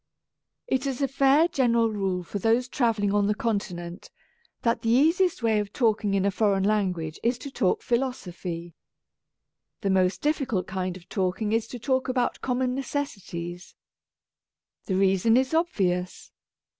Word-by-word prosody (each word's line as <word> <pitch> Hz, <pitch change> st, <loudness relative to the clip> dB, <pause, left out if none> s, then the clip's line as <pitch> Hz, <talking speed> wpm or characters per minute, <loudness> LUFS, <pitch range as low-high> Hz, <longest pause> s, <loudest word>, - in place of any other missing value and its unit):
It 265 Hz, +1 st, 0 dB
is 270 Hz, 0 st, -2 dB
a -, -, +3 dB
fair 275 Hz, +4 st, +4 dB
general 235 Hz, -7 st, +2 dB
rule 190 Hz, -3 st, -1 dB
for 200 Hz, +4 st, -5 dB
those 230 Hz, +5 st, +2 dB
travel 230 Hz, -5 st, 0 dB
ling 200 Hz, 0 st, +1 dB
on 205 Hz, -1 st, +2 dB
the 210 Hz, -, +1 dB
Continent 185 Hz, -6 st, -3 dB, 0.5 s
that 230 Hz, -1 st, +1 dB
the 225 Hz, -, -1 dB
easiest 320 Hz, +5 st, +3 dB
way 220 Hz, -2 st, +3 dB
of 205 Hz, -1 st, -3 dB
talking 215 Hz, -4 st, +1 dB
in 195 Hz, 0 st, +1 dB
a 200 Hz, -, +2 dB
foreign 200 Hz, -1 st, +1 dB
language 185 Hz, -6 st, 0 dB
is 240 Hz, +1 st, +1 dB
to 280 Hz, +2 st, -8 dB
talk 195 Hz, -8 st, 0 dB
philosophy. 180 Hz, -9 st, -3 dB, 1.1 s
The 200 Hz, -3 st, 0 dB
most 185 Hz, -1 st, +2 dB
difficult 275 Hz, -10 st, 0 dB
kind 185 Hz, -1 st, -3 dB
of 175 Hz, -, -17 dB
talking 195 Hz, +2 st, -1 dB
is 225 Hz, 0 st, +1 dB
to 245 Hz, -, -7 dB
talk 260 Hz, +2 st, 0 dB
about 250 Hz, -1 st, 0 dB
common 250 Hz, 0 st, 0 dB
necessities. 195 Hz, -11 st, -5 dB, 1.1 s
The 190 Hz, -, -1 dB
reason 195 Hz, +4 st, +3 dB
is 260 Hz, +3 st, +1 dB
obvious. 185 Hz, -, -1 dB
215 Hz, 155 wpm, -26 LUFS, 190-255 Hz, 1.1 s, fair